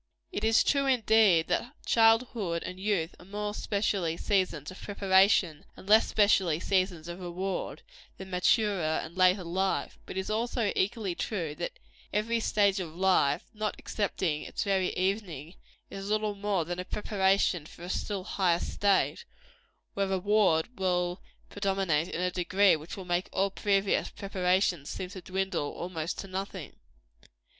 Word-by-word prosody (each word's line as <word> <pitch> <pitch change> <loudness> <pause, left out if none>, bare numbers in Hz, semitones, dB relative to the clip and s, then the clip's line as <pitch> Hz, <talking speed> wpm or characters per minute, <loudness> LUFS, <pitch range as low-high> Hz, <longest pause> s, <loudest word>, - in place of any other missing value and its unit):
It 205 - -4
is 225 +1 +4
true, 280 -1 +2
indeed, 220 -9 +4
that 240 +10 -1
childhood 225 -6 +2
and 185 0 -7
youth 190 -4 -1
are 175 - -14
more 205 +2 -4
specially 200 -6 -1
seasons 185 -7 0
of 185 - -12
preparation, 190 -5 +3
and - - -13
less 215 +2 +6
specially 190 -6 +3
seasons 185 -3 0
of 175 +1 -7
reward, 185 +2 -4 0.3
than 190 0 -9
maturer 180 -3 +2
and 165 +2 -10
later 185 +1 +4
life; 190 +3 -2
but - - -6
it - - +1
is 190 - -6
also 230 -1 0
equally 195 -1 0
true, 170 -5 -3
that - - -5 0.3
every 230 +3 0
stage 200 -3 +2
of 165 -3 -6
life, 180 -6 +2
not 215 -1 -2
excepting 185 -7 -2
its - - -4
very 195 -2 +1
evening, 185 -5 -2 0.4
is 195 +1 -6
little 215 0 0
more 200 -4 -1
than 175 +2 -4
a - - -2
preparation 190 -6 +1
for 170 - -13
a - - -6
still 195 0 -3
higher 185 -3 +1
state, 200 +2 +1 0.7
where 195 -1 0
reward 195 +1 +1
will 180 -1 0 0.3
predominate 190 -6 0
in 180 - -4
a 180 0 0
degree 190 +2 +3
which 155 +4 -8
will 190 - -7
make 175 +1 -1
all 195 +1 0
previous 195 0 +1
preparation 185 -4 0
seem 180 +5 -6
to 190 -2 -8
dwindle 190 -5 -2
almost 170 -1 -4
to 195 - -6
nothing. 190 -3 -6
190 Hz, 155 wpm, -29 LUFS, 175-205 Hz, 0.7 s, less